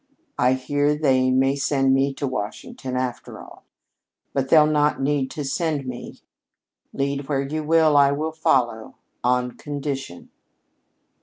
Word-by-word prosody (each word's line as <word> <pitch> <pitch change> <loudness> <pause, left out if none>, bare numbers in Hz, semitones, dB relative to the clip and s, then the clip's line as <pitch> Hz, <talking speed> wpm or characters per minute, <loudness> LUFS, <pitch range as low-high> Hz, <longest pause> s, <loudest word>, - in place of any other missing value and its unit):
I 125 +1 +4
hear 145 +3 0
they 130 -4 +2
may 135 +1 +2
send 135 -1 +1
me 135 +1 +2
to 140 - -3
Washington, 125 +2 -5
after 125 -1 -4
all. - - -14 0.7
But 135 -1 -1
they'll 155 -2 +7
not 150 -1 +1
need 135 -1 0
to 150 - -5
send 150 0 -1
me. 125 -1 -8 0.7
Lead 140 0 -2
where 140 -2 0
you 155 +3 -3
will, 160 -1 +3
I 140 -1 +6
will 155 +3 -2
follow 125 -8 0 0.3
on 125 0 +1
condition!" 135 - -6
140 Hz, 140 wpm, -23 LUFS, 130-150 Hz, 0.7 s, they'll